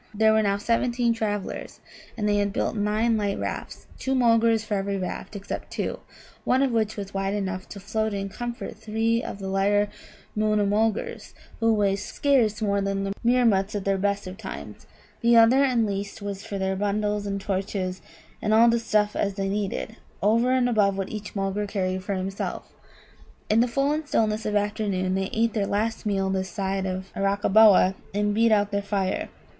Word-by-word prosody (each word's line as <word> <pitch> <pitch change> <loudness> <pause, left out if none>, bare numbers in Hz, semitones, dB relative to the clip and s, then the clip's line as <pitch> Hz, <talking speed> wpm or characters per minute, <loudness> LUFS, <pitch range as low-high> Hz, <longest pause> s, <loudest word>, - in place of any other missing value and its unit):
There 220 +1 +4
were 220 - +4
now 200 -1 +1
seventeen 235 +2 +1
travellers, 205 -3 -4 0.4
and 210 -2 0
they 205 0 +2
had 205 0 +1
built 205 - -1
nine 215 +2 +1
light 205 -2 -1
rafts - - -5
two 265 0 -1
Mulgars 230 -2 +3
for 215 - -3
every 200 0 -1
raft, 185 +3 -5
except 200 -1 -6
two; - - -3 0.4
one 260 +2 +3
of 270 - +1
which 220 -2 +1
two 205 - -4
was 195 0 -9
wide 195 +1 -1
enough 185 -2 -3
to 200 - -8
float 220 +2 -1
in 195 -1 -3
comfort 240 +4 -6
three 225 +2 0
of - - -6
the 195 -1 -6
lighter 205 +2 +2 0.5
Moona 215 -1 +2
mulgars, 215 +2 -1 0.2
who 225 0 +3
weigh 200 -2 +2
scarce 220 -1 +1
more 200 -1 +1
than 195 0 -1
Meermuts 230 -5 +3
at 200 - -3
the 195 0 +2
best 200 +1 -1
of 185 +1 -7
times; - - -8 0.3
the 235 -1 +5
other 235 +4 +6
and 245 -4 +2
least 200 0 -4
was 200 -1 -5
for 200 - -5
their 190 0 -1
bundles 205 +1 -1
and 200 0 -2
torches 190 -1 -3 0.4
and 215 +1 +2
all 230 +1 +6
such 235 0 +1
stuff 210 -2 +1
as 200 -1 -1
they 195 -1 -2
needed, 210 +2 -3 0.3
over 230 +4 +3
and 255 -1 +3
above 205 -5 +2
what 195 -1 -3
each 215 -1 -7
Mulgar 195 +1 -1
carried 185 -2 -2
for 195 +1 -2
himself. 190 +1 -4 0.8
In 215 - +4
the 240 - +4
full 275 +4 +1
and 305 0 -2
stillness 215 -4 0
of 210 - -1
afternoon 205 -3 0
they 190 0 -1
ate 225 0 +1
their 205 -3 0
last 220 +2 -1
meal 195 -2 0
this 190 0 -1
side 195 -1 -2
of 185 +1 -5
Arakkaboa, 200 0 +5 0.2
and 205 0 +1
beat 225 +2 +3
out 205 -1 +3
their 200 0 0
fire. 200 -2 -1
205 Hz, 190 wpm, -25 LUFS, 195-225 Hz, 0.8 s, other